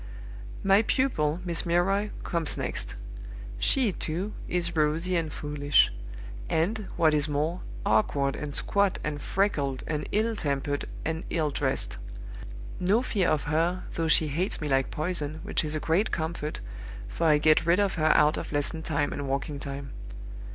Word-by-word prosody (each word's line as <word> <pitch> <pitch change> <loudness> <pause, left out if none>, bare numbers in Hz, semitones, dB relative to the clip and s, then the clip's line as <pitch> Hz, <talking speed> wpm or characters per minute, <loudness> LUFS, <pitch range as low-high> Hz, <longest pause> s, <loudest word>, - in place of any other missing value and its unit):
"My 195 +1 +5
pupil, 180 - 0
Miss 170 -2 0
Milroy, 195 +4 +1
comes 170 -4 -1
next. - - -3 0.6
She, 245 - +3
too, 180 +4 -3
is 170 -1 0
rosy 160 +4 +1
and 165 -3 -1
foolish; 145 -1 +2 0.6
and, 185 +6 0
what 160 -3 +4
is 150 0 +2
more, 155 +5 -1 0.2
awkward 140 -10 +2
and 150 -1 -5
squat 200 +6 +2
and 150 -1 -3
freckled, 145 -9 0
and 150 -1 -3
ill 220 +2 +1
tempered 145 -4 -2 0.2
and 160 +1 -2
ill 155 -3 0
dressed. - - -1 0.8
No 200 +7 +2
fear 200 -8 +1
of 155 - +1
her, 165 +4 0
though 165 -1 -1
she 155 0 +4
hates 175 +8 -1
me 150 - -3
like 135 -1 +1
poison, 155 -2 -3
which - - 0
is 155 0 -2
a - - 0
great 165 +8 +1
comfort, 160 -2 -3 0.5
for 165 - -1
I 150 -1 +6
get 155 +2 +3
rid 170 +3 +4
of 200 -1 +2
her 155 -2 +3
out 150 +1 +4
of - - -5
lesson 145 +2 +1
time 145 -2 -1
and 145 -1 -4
walking 140 +2 -2
time. 140 -1 -6
160 Hz, 160 wpm, -27 LUFS, 150-180 Hz, 0.8 s, I